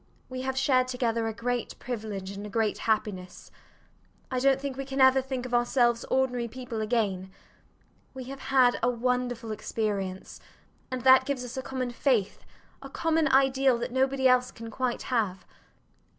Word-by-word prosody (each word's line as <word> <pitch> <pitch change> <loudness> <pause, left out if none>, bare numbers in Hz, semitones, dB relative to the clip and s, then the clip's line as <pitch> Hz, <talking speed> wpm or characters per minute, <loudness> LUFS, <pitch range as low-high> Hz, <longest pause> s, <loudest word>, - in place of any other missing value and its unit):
We 255 0 -5
have 265 0 -3
shared 255 -1 +3
together 235 -3 -1
a - - -1
great 245 +1 -3
privilege 210 -6 -5
and 200 +1 -7
a 210 - -6
great 220 -1 0
happiness. 200 -4 -2 0.8
I 255 - 0
dont 270 +1 +3
think 275 -1 -4
we 275 - -4
can 270 0 -5
ever 260 0 +6
think 260 -1 -4
of 250 - -7
ourselves 240 -1 +2
ordinary 250 -2 0
people 235 -2 -6
again. 210 -5 -1 0.9
We 260 - -6
have 270 +2 -8
had 255 -2 +4
a 245 - +3
wonderful 245 -1 -1
experience; 200 -3 -3 0.5
and 255 -1 -4
that 260 0 +7
gives 260 -3 -2
us 245 - -8
a 260 - -3
common 255 -1 -3
faith, 235 -5 0 0.4
a 275 - -9
common 325 +2 +1
ideal, 270 -1 +3
that 240 +1 -4
nobody 265 +1 +2
else 250 0 +4
can 230 0 -9
quite 250 +1 -2
have. 195 -6 0
250 Hz, 165 wpm, -28 LUFS, 225-265 Hz, 0.9 s, that